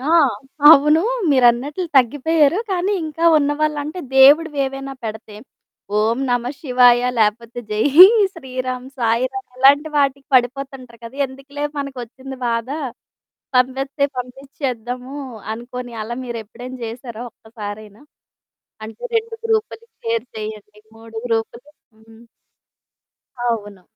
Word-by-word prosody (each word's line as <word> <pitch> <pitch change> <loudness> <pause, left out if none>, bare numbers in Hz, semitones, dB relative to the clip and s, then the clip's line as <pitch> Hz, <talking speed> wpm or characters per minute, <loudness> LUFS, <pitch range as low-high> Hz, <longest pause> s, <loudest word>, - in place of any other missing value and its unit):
ఆ! 280 +4 -2 0.6
అవును 300 +1 +7 0.3
మీరన్నట్లు 260 +6 +2
తగ్గిపోయారు. 290 - +3
కానీ, 375 +2 0
ఇంకా 315 +2 -4
ఉన్నవాాళ్ళంటే, 295 +2 -1 0.2
దేవుడువి 290 +3 +6
ఏవైనా 270 0 -6
పెడతే. 220 -1 -7 0.6
ఓం 225 +3 +1
నమ 245 -1 +1 0.2
శివాయ, 250 -3 +5 0.2
లేపోతే 225 +2 0
జై 210 +1 0 0.5
శ్రీరామ్, 255 -4 -5
సాయి 230 +1 +1
రాామ్ 265 -1 -7
ఇలాంటి 280 +4 +5
వాటికి 275 -1 +1
పడిపోతుంటారు 255 -1 -1
కదా! 230 +4 -10
ఎందుకులే 275 +2 -8
మనకొచ్చింది 265 -1 -7
బాధ. 230 0 -1 0.9
పంపెస్తే 270 +3 +1
పంపించేద్దాము 250 0 -5 0.4
అనుకోని, 245 +1 -8
అలా 235 +2 -5
మీరు 235 -2 -5
ఎప్పుడైనా 250 +4 -10
చేశారా 235 0 -7
ఒక్కసారైనా? 215 -2 -10 0.8
అంటే 220 0 -11
2 455 0 -2
గ్రూపులకి 445 0 -1 0.2
షేర్ 230 +1 -1
చేయండి. 215 -1 -8 0.2
3 225 0 -13
గ్రూపులు, 230 +3 -3 0.3
హ్మ్. 225 +1 -19 1.2
అవును. 205 -4 -4
255 Hz, 105 wpm, -19 LUFS, 230-280 Hz, 1.2 s, అవును